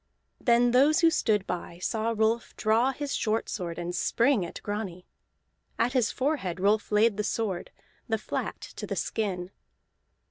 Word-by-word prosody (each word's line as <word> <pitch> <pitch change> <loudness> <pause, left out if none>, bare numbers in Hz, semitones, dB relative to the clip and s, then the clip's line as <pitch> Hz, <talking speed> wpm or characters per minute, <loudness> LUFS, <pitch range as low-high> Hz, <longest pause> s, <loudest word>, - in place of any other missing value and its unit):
Then 240 0 +4
those 280 +6 +5
who 330 -1 +6
stood 210 -9 +1
by 175 -1 -5
saw 225 +5 -1
Rolf 220 +2 +1
draw 230 +4 +3
his 285 +1 -4
short 220 0 0
sword 170 -4 -4
and 175 0 -4
spring 235 +3 +2
at 170 - -6
Grani. 205 -4 -4 0.7
At 245 - +1
his 250 -4 +2
forehead 255 - -1
Rolf 210 +3 +2
laid 210 0 +4
the 210 - 0
sword, 205 -4 -2 0.4
the 220 - +2
flat 215 - -4 0.2
to - - -5
the - - -3
skin. 190 -4 -2
220 Hz, 155 wpm, -28 LUFS, 190-240 Hz, 0.7 s, who